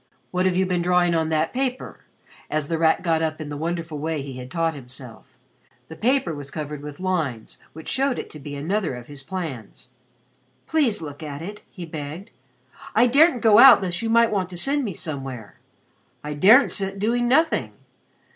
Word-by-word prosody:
What 185 Hz, +1 st, +1 dB
have 185 Hz, -, +1 dB
you 190 Hz, +1 st, +2 dB
been 180 Hz, -1 st, 0 dB
drawing 175 Hz, 0 st, +2 dB
on 160 Hz, -1 st, +1 dB
that 160 Hz, 0 st, 0 dB
paper?" 260 Hz, 0 st, -3 dB, 0.5 s
as 155 Hz, -1 st, -2 dB
The 165 Hz, -1 st, -1 dB
Rat 160 Hz, +1 st, +3 dB
got 165 Hz, -2 st, +1 dB
up 155 Hz, 0 st, -2 dB
in 155 Hz, -2 st, -6 dB
the 145 Hz, -, -5 dB
wonderful 165 Hz, 0 st, -4 dB
way 155 Hz, -1 st, -2 dB
he 135 Hz, -2 st, -8 dB
had 125 Hz, 0 st, -8 dB
taught 165 Hz, +2 st, 0 dB
himself. 125 Hz, -3 st, -12 dB, 0.5 s
The 160 Hz, -, -8 dB
paper 240 Hz, -, +1 dB
was 145 Hz, -2 st, -7 dB
covered 150 Hz, -1 st, -6 dB
with 145 Hz, -1 st, -9 dB
lines 160 Hz, -12 st, -3 dB
which 160 Hz, 0 st, -11 dB
showed 270 Hz, -1 st, 0 dB
it -, -, -6 dB
to 155 Hz, -, -10 dB
be 145 Hz, 0 st, -7 dB
another 165 Hz, +1 st, -2 dB
of 120 Hz, -1 st, -9 dB
his 145 Hz, 0 st, -11 dB
plans. 135 Hz, -, -7 dB, 0.8 s
"Please 275 Hz, -, +1 dB
look 145 Hz, -1 st, -8 dB
at 150 Hz, 0 st, -6 dB
it," 205 Hz, +4 st, -8 dB
he 180 Hz, -, -8 dB
begged. 155 Hz, +3 st, -7 dB, 0.6 s
"I 230 Hz, +3 st, +6 dB
daren't 275 Hz, +1 st, +4 dB
go 215 Hz, -1 st, +7 dB
out 265 Hz, -6 st, +9 dB
lest 175 Hz, -2 st, -3 dB
you 225 Hz, -, -2 dB
might 230 Hz, 0 st, +4 dB
want 190 Hz, -3 st, -1 dB
to 180 Hz, -, -8 dB
send 280 Hz, +9 st, 0 dB
me 200 Hz, -8 st, -4 dB
somewhere. 135 Hz, -9 st, -7 dB, 0.6 s
I 150 Hz, 0 st, -4 dB
daren't 215 Hz, -, +6 dB
sit 195 Hz, -1 st, -2 dB
doing 235 Hz, +4 st, +1 dB
nothing. 320 Hz, +6 st, +2 dB
165 Hz, 195 wpm, -23 LUFS, 145-205 Hz, 0.8 s, out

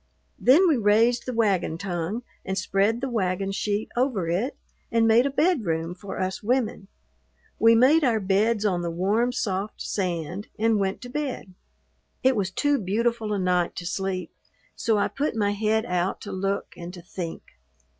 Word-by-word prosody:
Then 310 Hz, +10 st, +6 dB
we 310 Hz, -5 st, +3 dB
raised 230 Hz, +3 st, +3 dB
the -, -, -1 dB
wagon 200 Hz, -8 st, +1 dB
tongue 185 Hz, +4 st, -3 dB, 0.2 s
and 190 Hz, 0 st, -3 dB
spread 200 Hz, +5 st, +1 dB
the 270 Hz, -, -1 dB
wagon 195 Hz, -4 st, -1 dB
sheet 205 Hz, +1 st, -2 dB
over 240 Hz, -8 st, 0 dB
it 190 Hz, +11 st, -1 dB, 0.3 s
and 230 Hz, -1 st, +3 dB
made 235 Hz, +4 st, +5 dB
a -, -, -1 dB
bedroom 220 Hz, -, 0 dB
for 190 Hz, +2 st, -7 dB
us 185 Hz, 0 st, -2 dB
women. 230 Hz, -3 st, -1 dB, 0.7 s
We 230 Hz, +1 st, +6 dB
made 280 Hz, +7 st, +5 dB
our 235 Hz, -5 st, +3 dB
beds 210 Hz, +3 st, +1 dB
on 180 Hz, -4 st, +1 dB
the 170 Hz, -, -2 dB
warm, 205 Hz, +8 st, +1 dB
soft 205 Hz, -3 st, -3 dB
sand 180 Hz, 0 st, -3 dB
and 225 Hz, -1 st, +2 dB
went 195 Hz, 0 st, -1 dB
to 245 Hz, -, -8 dB
bed. 265 Hz, -8 st, -4 dB, 0.7 s
It 260 Hz, 0 st, +4 dB
was 195 Hz, -3 st, 0 dB
too 285 Hz, +8 st, +1 dB
beautiful 220 Hz, +3 st, -1 dB
a 205 Hz, -, 0 dB
night 180 Hz, -2 st, +1 dB
to 175 Hz, -, -6 dB
sleep, 185 Hz, -1 st, -3 dB, 0.4 s
so 225 Hz, -2 st, +1 dB
I 205 Hz, -, +2 dB
put 285 Hz, -3 st, -2 dB
my 205 Hz, -2 st, +1 dB
head 215 Hz, +2 st, 0 dB
out 180 Hz, +1 st, -1 dB
to 205 Hz, -, -7 dB
look 195 Hz, +1 st, -2 dB
and 175 Hz, 0 st, -8 dB
to 175 Hz, -, -11 dB
think. 175 Hz, -2 st, -6 dB
205 Hz, 175 wpm, -25 LUFS, 185-235 Hz, 0.7 s, Then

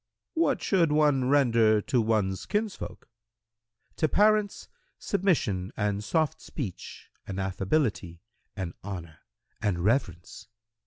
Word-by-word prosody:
Q 325 Hz, -, 0 dB
"What 285 Hz, -5 st, +1 dB
should 170 Hz, -6 st, +2 dB
one 145 Hz, -4 st, +3 dB
render 115 Hz, -6 st, +4 dB
to 120 Hz, +3 st, +1 dB
one's 105 Hz, -4 st, 0 dB
kinsfolk?"—"To 115 Hz, -, -6 dB
parents, 210 Hz, 0 st, +2 dB, 0.3 s
submission 140 Hz, -, 0 dB
and 105 Hz, -1 st, -1 dB
soft 155 Hz, +6 st, 0 dB
speech 110 Hz, -, -7 dB, 0.2 s
and 95 Hz, 0 st, -4 dB
affability 95 Hz, -, -1 dB, 0.3 s
and 95 Hz, -4 st, -4 dB
honour 85 Hz, -5 st, -7 dB, 0.4 s
and 100 Hz, -4 st, 0 dB
reverence. 90 Hz, -, -1 dB
110 Hz, 105 wpm, -28 LUFS, 95-150 Hz, 0.4 s, render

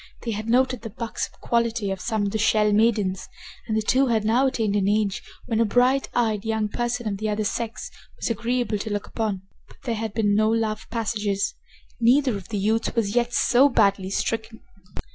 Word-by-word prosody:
They 230 Hz, -, -2 dB
had 215 Hz, +1 st, -4 dB
noted 255 Hz, 0 st, +2 dB
the 225 Hz, -, -6 dB
buxom 230 Hz, +2 st, -5 dB
quality 230 Hz, -3 st, 0 dB
of 190 Hz, -, -4 dB
some 220 Hz, -3 st, -1 dB
of 200 Hz, -, -1 dB
the 220 Hz, -, -2 dB
Shell 210 Hz, 0 st, +3 dB
maidens, 210 Hz, -3 st, +1 dB, 0.4 s
and 220 Hz, -, 0 dB
the 220 Hz, -, 0 dB
two 265 Hz, +5 st, +3 dB
had 220 Hz, -3 st, +1 dB
now 245 Hz, +5 st, +3 dB
attained 220 Hz, -5 st, 0 dB
an 200 Hz, -1 st, +1 dB
age 205 Hz, -1 st, +1 dB, 0.2 s
when 225 Hz, -2 st, -1 dB
a -, -, +5 dB
bright 250 Hz, +5 st, +2 dB
eyed 220 Hz, -4 st, +1 dB
young 220 Hz, -1 st, -1 dB
person 240 Hz, +1 st, -2 dB
of 200 Hz, -2 st, -3 dB
the 215 Hz, 0 st, -1 dB
other 210 Hz, +1 st, -1 dB
sex 225 Hz, +1 st, -4 dB, 0.3 s
was -, -, -3 dB
agreeable 235 Hz, -1 st, -1 dB
to 215 Hz, -, -4 dB
look 205 Hz, -1 st, -2 dB
upon. 210 Hz, -4 st, -3 dB, 0.2 s
But -, -, -19 dB
there 240 Hz, -, -1 dB
had 220 Hz, -1 st, -4 dB
been 205 Hz, -3 st, +2 dB
no 215 Hz, +1 st, +3 dB
love 220 Hz, -1 st, -1 dB
passages. 210 Hz, -3 st, -1 dB, 0.5 s
Neither 250 Hz, +1 st, +3 dB
of 195 Hz, -3 st, -7 dB
the 210 Hz, -, -3 dB
youths 220 Hz, +5 st, 0 dB
was 210 Hz, -3 st, 0 dB
yet 240 Hz, 0 st, +2 dB
so 255 Hz, +4 st, +4 dB
badly 200 Hz, -6 st, +2 dB
stricken. 225 Hz, +2 st, -3 dB
220 Hz, 200 wpm, -24 LUFS, 210-235 Hz, 0.5 s, a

